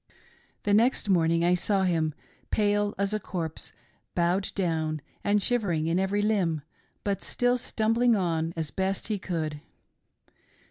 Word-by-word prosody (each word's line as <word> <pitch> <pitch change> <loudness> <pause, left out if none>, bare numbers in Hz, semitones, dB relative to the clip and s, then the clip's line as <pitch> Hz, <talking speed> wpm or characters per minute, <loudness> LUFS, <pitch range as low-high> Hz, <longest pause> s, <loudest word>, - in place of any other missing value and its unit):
The 205 - +2
next 225 0 +3
morning 170 -2 +3
I 175 - +4
saw 190 +2 +1
him, 160 -4 +1 0.3
pale 205 -1 +1
as 200 +1 0
a 215 - +1
corpse, 165 -5 -4 0.4
bowed 180 +3 +1
down, 160 -4 0 0.2
and 205 -1 +2
shivering 190 -10 +1
in 165 +3 +1
every 200 +2 +1
limb, 180 -8 +1 0.4
but 200 -1 -1
still 245 0 +1
stumbling 230 0 +2
on 165 -4 0
as 160 -3 -2
best 190 +3 -1
he 210 -2 -1
could. 155 -5 -3
190 Hz, 140 wpm, -28 LUFS, 165-205 Hz, 0.4 s, I